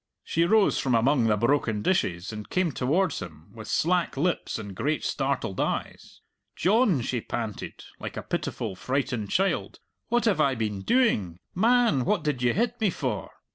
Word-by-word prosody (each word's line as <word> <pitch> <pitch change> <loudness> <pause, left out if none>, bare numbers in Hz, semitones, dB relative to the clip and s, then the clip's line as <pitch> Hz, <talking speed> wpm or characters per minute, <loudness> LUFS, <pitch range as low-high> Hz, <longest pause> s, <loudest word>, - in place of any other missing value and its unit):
She 165 +1 +1
rose 215 +2 +3
from 130 -3 +1
among 125 +2 +3
the 105 -1 +3
broken 115 -3 +1
dishes 95 - 0
and 105 -1 -7
came 185 -3 +1
towards 160 +9 0
him, 80 -3 -10
with 110 -2 -9
slack 175 -3 +1
lips 175 +5 0
and 100 -3 -7
great 145 +9 -1
startled 135 -8 -1
eyes. - - -3 0.3
"John," 200 - +3
she 120 -1 -2
panted, 110 -3 -5 0.2
like - - -6
a - - -4
pitiful 95 - -3
frightened 125 -1 -2
child, 195 - 0 0.3
"what 240 0 +1
have 200 -8 +3
I 140 -3 +3
been 105 -4 -2
doing?... 105 - +2 0.2
Man, 225 - +3
what 190 +3 +1
did 145 -5 -1
you 125 -1 +3
hit 240 +2 0
me 215 - +3
for?" - - -3
140 Hz, 170 wpm, -26 LUFS, 110-185 Hz, 0.3 s, rose